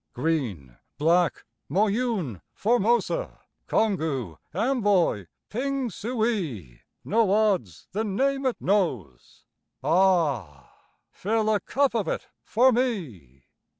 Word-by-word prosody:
Green, 120 - -2 0.2
Black, 165 0 +2 0.2
Moyune, 200 - 0
Formosa, 240 - +1 0.3
Congou, 155 - 0
Amboy, 200 - +1 0.2
Pingsuey 220 - -2 0.3
No 220 -1 +2
odds 195 - +1
the 215 +4 -1
name 270 +6 0
it 255 - -2
knows 130 - -2 0.4
ah! 155 - +1 0.4
Fill 215 +2 0
a 210 - +2
cup 275 +3 +1
of 225 -4 -1
it - - -3 0.2
for 255 +4 +4
me! 135 - -3
195 Hz, 90 wpm, -26 LUFS, -, 0.4 s, for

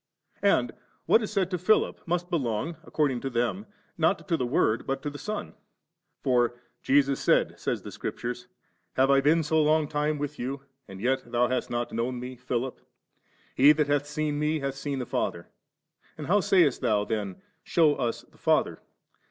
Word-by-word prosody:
And 125 - +3 0.3
what 225 - +5
is 215 - -4
said 195 -3 0
to 180 - -1
Philip 215 +5 +2
must 175 +1 -1
belong, 140 0 -1
according 135 -6 0
to 135 - -3
them, 120 - -1 0.3
not 165 +4 +1
to 170 - +2
the 125 -6 -1
Word, 115 -2 +1
but 135 0 -2
to 145 - -3
the 145 - -9
Son. 210 0 -5 0.7
For, 120 -3 +2
* - - -46
Jesus 140 0 +3
said,' - - +2
says - - -2
Scripture, 120 +1 -4 0.6
'Have 135 +1 +4
I 135 0 +5
been 160 +4 +3
so 155 +1 +2
long 155 0 +3
time 150 +1 -1
with 145 -1 -5
you, 135 +3 -4 0.3
and 95 -1 -10
yet 130 +2 -1
thou 120 0 +2
hast 130 -1 -1
not 120 0 -3
known 120 +2 -2
Me, 125 +1 -7
Philip? 125 +1 -3 0.7
He 145 +3 +7
that 150 0 +1
hath 145 0 0
seen 150 0 -2
Mc, 155 +1 +1
hath 135 0 -1
seen 135 0 -4
the 125 - -3
Father. - - -3 0.7
And 150 - -6
how 205 +6 +3
saycst 175 -8 +3
thou 105 -2 +1
then, 100 -4 -3 0.2
Shew 160 -3 +4
us 120 -5 -2
the - - -25
Father - - +1
140 Hz, 185 wpm, -27 LUFS, 125-155 Hz, 0.7 s, He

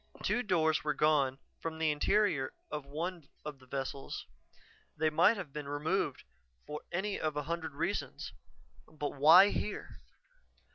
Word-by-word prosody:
Two 245 - +2
doors 160 -7 +2
were 150 0 0
gone 140 -4 +3 0.2
from 160 -1 -4
the 160 -1 +2
interior 150 -3 +2 0.2
of 150 -2 -4
one 165 +2 -4 0.2
of 150 -3 -6
the 130 - -18
vessels. 135 +1 -4 0.7
They 155 0 +2
might 175 +8 +5
have 165 -8 -6
been 150 -1 -5
removed 145 +1 -1 0.4
for 150 0 -6
any 195 +3 -1
of 155 -1 -1
a 150 - -1
hundred 160 -1 -4
reasons 170 +7 -3 0.5
but 150 -2 -4
why 165 +8 +8
here? 210 - -4
155 Hz, 145 wpm, -33 LUFS, 145-170 Hz, 0.7 s, why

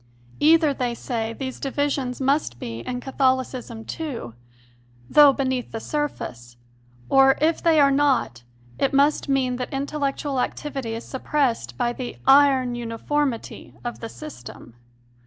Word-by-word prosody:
Either, 315 -1 +5
they 245 -3 -2
say, 225 -2 -3
these 260 +2 -6
divisions 275 -2 -2
must 270 - 0
be 115 -1 -6
in 245 - -4
Catholicism 260 -3 -1
too, 265 - -5 0.7
though 295 - +7
beneath 260 -2 -2
the 225 - -4
surface, 120 - -4 0.5
or, 270 0 +5
if 315 +2 +1
they 325 -2 +4
are 280 -1 +5
not, 270 - +1 0.4
it 275 - +1
must 285 +1 +2
mean 260 -2 +1
that 250 - -5
intellectual 280 0 -2
activity 265 -3 -3
is 230 - -7
suppressed 255 - -1
by 240 - 0
the 250 0 -6
"iron 270 -2 +5
uniformity" 240 +3 -3
of 240 - -4
the 230 - -6
system. 125 - -10
265 Hz, 135 wpm, -23 LUFS, 240-285 Hz, 0.7 s, though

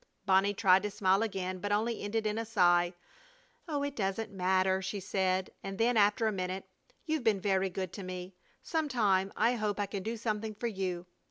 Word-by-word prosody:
Bonnie 195 +1 +3
tried 190 -3 +5
to 210 - -2
smile 195 -1 +2
again, 185 -4 -2
but 205 +3 -3
only 220 +2 0
ended 215 +2 -2
in 215 +1 0
a - - -1
sigh. 175 -6 +3 0.8
"Oh, 290 -3 -1
it 285 -1 -3
doesn't 205 0 -2
matter," 190 0 +2
she 200 +2 -3
said, 190 -1 0
and 195 0 -5
then, 235 +2 +2
after 210 +1 +4
a 220 - +2
minute, 185 -1 -3 0.4
"You've 315 -4 -1
been 220 -4 +3
very 190 0 +1
good 185 -1 -4
to 195 - -6
me. 185 0 -6 0.3
Some 320 -3 -1
time 195 -6 +2
I 230 +3 +3
hope 210 -3 -1
I 205 - +1
can 200 0 -5
do 225 +4 -3
something 215 -1 -2
for 235 - -5
you. 190 -5 -2
200 Hz, 200 wpm, -31 LUFS, 190-220 Hz, 0.8 s, tried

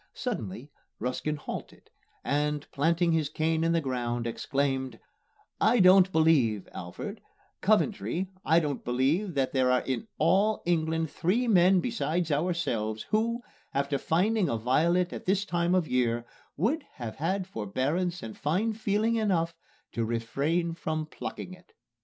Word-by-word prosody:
Suddenly 135 - -4 0.3
Ruskin 125 +5 -2
halted 145 - -8 0.3
and, 150 0 0
planting 165 +4 +2
his 160 -3 +1
cane 160 +1 0
in 165 - +2
the 170 - +3
ground, 120 -3 -2
exclaimed, 130 0 -1 0.6
"I 230 +2 +4
don't 185 0 +7
believe, 140 - +3
Alfred 200 - -7 0.4
Coventry, 205 -3 +1 0.2
I 165 - +4
don't 145 -5 -3
believe 145 +10 0
that 135 -2 0
there 130 -1 +3
are 125 0 +3
in 135 - -3
all 210 +3 +2
England 160 -2 0
three 225 +9 +1
men 185 -3 +5
besides 170 - -1
ourselves 145 -10 -1
who, 230 +2 +1 0.3
after 140 0 0
finding 190 +4 +1
a 115 - 0
violet 170 +10 +2
at - - -8
this 195 +1 +2
time 175 0 +1
of 180 -4 +1
year, 120 -2 +1 0.3
would 260 - +1
have 115 -3 -6
had 185 +5 -1
forbearance 155 - -2
and 110 -1 -7
fine 185 +10 0
feeling 220 +1 +1
enough 175 -6 +1 0.4
to 115 - -1
refrain 140 +10 -1
from 155 -1 -3
plucking 175 +3 -7
it." 185 -1 -17
160 Hz, 140 wpm, -28 LUFS, 130-185 Hz, 0.6 s, don't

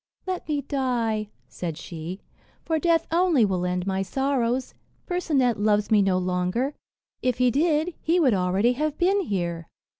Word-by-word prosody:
"Let 370 -1 -4
me 290 -2 0
die," 240 -6 -1 0.2
said 165 -4 -5
she, 170 +3 -7 0.4
"for 320 -1 0
death 330 0 +2
only 335 -8 +4
will 180 -2 -1
end 180 0 -1
my 190 0 -1
sorrows. 255 +3 -1 0.3
Percinet 280 - +1
loves 210 0 +2
me 210 -2 +6
no 190 -2 +2
longer; 185 +9 -1 0.5
if 250 -2 0
he 250 0 +3
did, 315 +4 +1
he 335 +3 +2
would 270 -8 +4
already 190 +5 +2
have 300 +3 -2
been 380 +3 +3
here." 175 - -3
240 Hz, 155 wpm, -25 LUFS, 190-305 Hz, 0.5 s, me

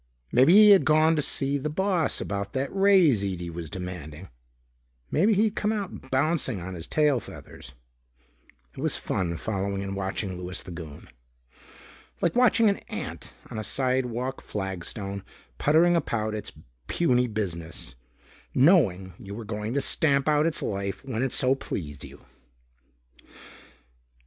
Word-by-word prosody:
Maybe 130 +8 +5
he 210 0 +9
had 195 -6 +7
gone 155 +3 +4
to 150 - +1
see 140 0 0
the 150 +3 -3
boss 180 -1 0
about 100 0 -4
that 135 +6 -3
raise 190 - +5
Ede 90 -3 -4
was 85 -2 -6
demanding. 90 -2 -7 0.8
Maybe 205 +7 +3
he'd 215 +1 +2
come 210 - 0
out 200 -10 -5
bouncing 135 - +1
on 95 +2 -6
his 85 -2 -7
tail 150 -4 +2
feathers. 70 - -12 1.0
It - - -10
was - - +1
fun 85 -3 -2
following 100 -1 -3
and 100 0 -4
watching 95 0 -3
Louis 90 +1 -3
the 90 - -9
Goon. 80 -4 -9 1.1
Like 170 - 0
watching 240 -2 +4
an 200 - +2
ant - - -7 0.2
on 110 - -4
a - - -3
sidewalk 130 +2 -1
flagstone 95 0 -5 0.4
puttering 165 +4 +4
about 110 -9 -1
its 105 - -5 0.4
puny 125 -7 +2
business, 85 - -5 0.6
knowing 115 - +4
you 100 +1 -8
were 115 0 -7
going 105 +3 -4
to 140 - +2
stamp 140 0 +2
out 150 +1 +3
its 165 - -1
life 100 +3 -4
when 125 -4 -3
it 135 -1 0
so 130 0 +3
pleased 75 - -6
you. - - -13
120 Hz, 145 wpm, -26 LUFS, 95-155 Hz, 1.1 s, he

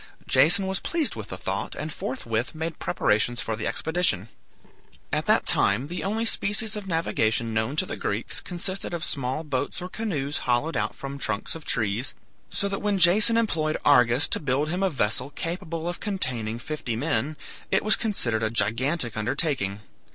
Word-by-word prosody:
Jason 160 +9 +5
was 190 0 -1
pleased 330 -4 0
with - - -7
the - - -5
thought, - - -3
and 155 0 -5
forthwith 120 0 -3
made 160 0 -4
preparations 110 +3 +1
for 110 - -2
the 110 - -3
expedition. 160 - +1 0.8
At - - 0
that - - +4
time 115 +9 +4
the 175 - -4
only 220 +3 -1
species 215 0 +2
of 205 -2 -6
navigation 115 - 0
known 110 +5 0
to 175 - +2
the - - -5
Greeks 105 +3 -1
consisted 180 +1 -3
of 170 - -4
small 135 +1 -1
boats 140 -2 -2
or 180 - -6
canoes 155 -10 -2
hollowed 130 +7 +1
out 105 -2 -1
from 140 0 -7
trunks 100 - -1
of 165 -2 -9
trees, 115 +2 -1 0.3
so 200 - 0
that 195 0 -3
when 205 -1 +1
Jason 205 +6 +6
employed 160 -9 +1
Argus 125 -1 +5
to - - +1
build 145 +1 0
him 180 +4 -2
a 195 - +3
vessel 115 - 0
capable 165 +2 -4
of 175 - -3
containing 125 - -2
fifty 120 -2 -4
men, 140 +3 -1 0.3
it 195 - +2
was 215 - +6
considered 120 - -1
a 110 - +1
gigantic 120 +4 0
undertaking. 110 - 0
150 Hz, 175 wpm, -26 LUFS, 120-180 Hz, 0.8 s, Jason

